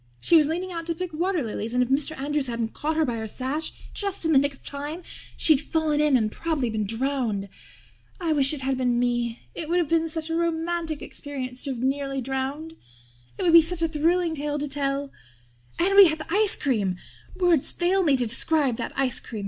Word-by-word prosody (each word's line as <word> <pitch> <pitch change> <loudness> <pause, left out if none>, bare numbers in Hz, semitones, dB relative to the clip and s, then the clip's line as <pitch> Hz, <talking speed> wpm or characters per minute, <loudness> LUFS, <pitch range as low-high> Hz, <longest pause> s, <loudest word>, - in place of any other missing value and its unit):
She 340 - +4
was 305 -3 +6
leaning 355 +4 -3
out 335 -1 -5
to 335 - -1
pick 360 0 -5
water 345 0 0
lilies 225 +1 -4
and 250 - +4
if 245 - -4
Mr. 290 +3 0
Andrews 290 0 -1
hadn't 230 -2 -3
caught 310 +2 -2
her 320 0 +2
by 240 -4 -2
her 220 0 -4
sash 265 +8 -3 0.2
just 400 -4 -3
in 320 - +2
the 280 - +6
nick 285 +1 +1
of - - -25
time 295 +5 -6 0.3
she'd 305 -4 +6
fallen 310 -1 0
in 295 -3 +4
and 215 -3 -1
prob'ly 295 -7 -2
been 215 -2 -2
drowned. 225 -3 -2 0.7
I 335 -3 0
wish 275 -2 +4
it 300 -3 -4
had 265 0 -1
been 245 -2 +1
me. 240 -1 -1
It 320 -2 -5
would 350 - +2
have 340 -4 +1
been 330 0 +2
such 320 0 -4
a - - 0
romantic 335 -1 -2
experience 260 -3 -6
to - - -3
have 250 -3 -4
been 260 - +2
nearly 275 0 -3
drowned. 270 +5 -4 0.6
It - - -3
would 340 -2 +3
be 335 - +10
such 335 +1 -1
a - - +3
thrilling 330 +2 +1
tale 295 -1 -3
to 295 0 -3
tell. 275 0 -2 0.7
And 390 +3 +2
we 400 -2 +10
had 315 -1 -1
the 320 +2 -6
ice 420 0 +6
cream. 210 -9 0 0.4
Words 350 -6 +2
fail 365 +2 +1
me 290 -7 +3
to 250 - +2
describe 260 +2 +1
that - - -5
ice 265 -2 +1
cream. 220 - -8
295 Hz, 225 wpm, -25 LUFS, 260-330 Hz, 0.7 s, be